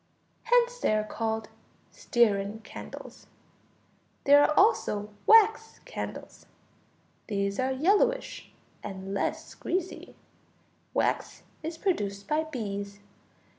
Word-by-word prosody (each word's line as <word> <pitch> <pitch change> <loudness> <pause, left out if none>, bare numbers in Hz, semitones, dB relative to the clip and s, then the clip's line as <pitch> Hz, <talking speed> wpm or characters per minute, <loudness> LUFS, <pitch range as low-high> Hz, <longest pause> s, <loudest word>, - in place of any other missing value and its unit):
Hence - - +3
they 215 - +2
are 215 - +1
called 220 0 -3 0.4
stearine 215 -2 +1
candles. - - -10 1.0
There 285 +1 +7
are - - +3
also 210 - +2 0.2
wax 445 0 +5
candles. - - -7 0.8
These 200 -2 -1
are 260 0 +1
yellowish 410 - +1 0.3
and 195 -1 -6
less 200 - -2
greasy. 370 0 -4 0.8
Wax - - -1 0.2
is 320 +1 -5
produced 205 - -2
by 310 +1 +1
bees. 205 -8 -5
240 Hz, 95 wpm, -28 LUFS, -, 1.0 s, There